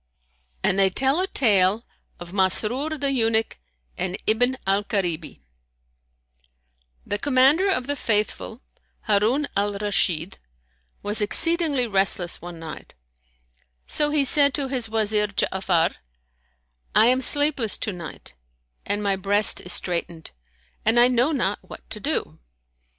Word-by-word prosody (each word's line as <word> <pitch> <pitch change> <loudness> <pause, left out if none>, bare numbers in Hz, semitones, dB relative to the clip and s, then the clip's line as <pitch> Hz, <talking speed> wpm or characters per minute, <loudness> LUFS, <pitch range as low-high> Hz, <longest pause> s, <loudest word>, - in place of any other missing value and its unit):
And 195 - +1
they 195 -1 +4
tell 270 - +1
a 375 - -1
tale 210 - +2 0.3
of 175 +1 -10
MASRUR 230 +10 0
THE 280 -1 -1
EUNUCH 225 -3 0 0.4
AND 185 +1 -3
IBN 245 +4 +2
AL 195 +1 +1
KARIBI 175 - -3 1.6
The 205 - -3
Commander 285 - +3
of 250 -10 0
the 285 +2 -3
Faithful, 220 0 -2 0.4
Harun 220 +8 +1
al 205 +1 0
Rashid, 195 -4 -1 0.6
was 210 +1 0
exceedingly 295 +5 +2
restless 195 -4 0
one 175 0 -9
night; 165 - -10 0.9
so 295 -1 -1
he 295 -1 +1
said 280 0 +3
to 275 -2 -3
his 250 -4 -2
Wazir 215 -1 +1
Ja'afar, 190 -4 -1 1.0
"I 220 - +6
am 255 +2 +3
sleepless 280 -5 +2
to 210 - -3
night 170 - -10 0.5
and 205 +1 -3
my 200 -1 +1
breast 200 +2 +3
is 180 - -4
straitened 170 -2 -3 0.5
and 225 +2 +3
I 245 +1 +6
know 250 +4 +1
not 225 -9 -1
what - - -13
to - - -3
do." - - -4
215 Hz, 130 wpm, -23 LUFS, 195-260 Hz, 1.6 s, I